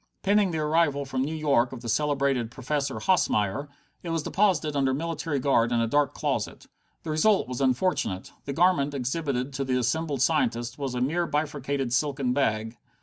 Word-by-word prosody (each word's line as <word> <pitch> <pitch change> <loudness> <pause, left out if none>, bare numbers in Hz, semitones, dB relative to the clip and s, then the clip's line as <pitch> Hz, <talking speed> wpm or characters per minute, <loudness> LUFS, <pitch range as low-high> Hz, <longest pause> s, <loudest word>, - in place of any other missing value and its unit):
Pending 200 0 +3
the 165 - -2
arrival 150 -2 +1
from 130 -1 -2
New 150 +4 -2
York 140 -6 +2
of 130 -3 -8
the 120 - -7
celebrated 140 -1 +1
Professor 135 +3 -2
Hosmeyer, 140 - +1 0.3
it 170 - -6
was 165 -2 -1
deposited 170 -7 +1
under 135 -2 +2
military 165 -1 -2
guard 125 -3 +2
in 120 - +2
a 115 - +2
dark 145 +4 +1
closet. 135 -8 -2 0.4
The 160 - -4
result 195 - +3
was 125 +1 -4
unfortunate. 130 - 0
The 140 - -3
garment 145 -3 +2
exhibited 135 0 -2
to 135 0 -2
the 130 -1 0
assembled 135 +2 0
scientists 120 -6 0
was 135 -3 -3
a 125 - -1
mere 165 +7 0
bifurcated 140 -4 -2
silken 135 -2 0
bag. 110 -4 0
140 Hz, 175 wpm, -26 LUFS, 125-155 Hz, 0.4 s, Pending